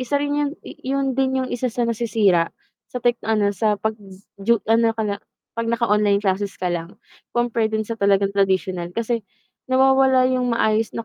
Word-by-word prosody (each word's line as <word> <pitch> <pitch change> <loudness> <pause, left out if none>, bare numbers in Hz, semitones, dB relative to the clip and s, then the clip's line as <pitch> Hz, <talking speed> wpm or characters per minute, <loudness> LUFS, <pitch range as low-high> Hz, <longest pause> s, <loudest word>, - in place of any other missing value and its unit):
isa 255 +3 0
rin 285 0 -1
yun 290 -1 0
i - - -8
iyun 270 0 -1
din 265 0 0
yung 255 - -6
isa 250 +1 -1
sa 240 0 -1
nasisira 215 -7 +2 0.4
sa 250 -1 -7
tech 240 0 +2
ano 210 -2 +1
sa 210 +2 +1
z - - -28
pag 220 0 +1 0.5
ju 235 +4 +3
ano 225 +1 +3
ka 220 - -1
na, 200 -1 -1 0.4
'pag 230 0 -3
naka 235 +1 +1
online 210 -1 +3
classes 195 +1 -1
ka 180 -1 -2
lang 170 +1 -5 0.4
compare 235 -2 +1
dun 220 0 -2
sa 230 - -5
talagang 200 -2 +2
tradisyonal 190 -3 0
kasi 230 0 -1 0.5
nawawala 265 0 +4
yung 250 -2 0
maayos 220 0 +1
na 230 - -4
225 Hz, 195 wpm, -22 LUFS, 200-250 Hz, 0.5 s, nawawala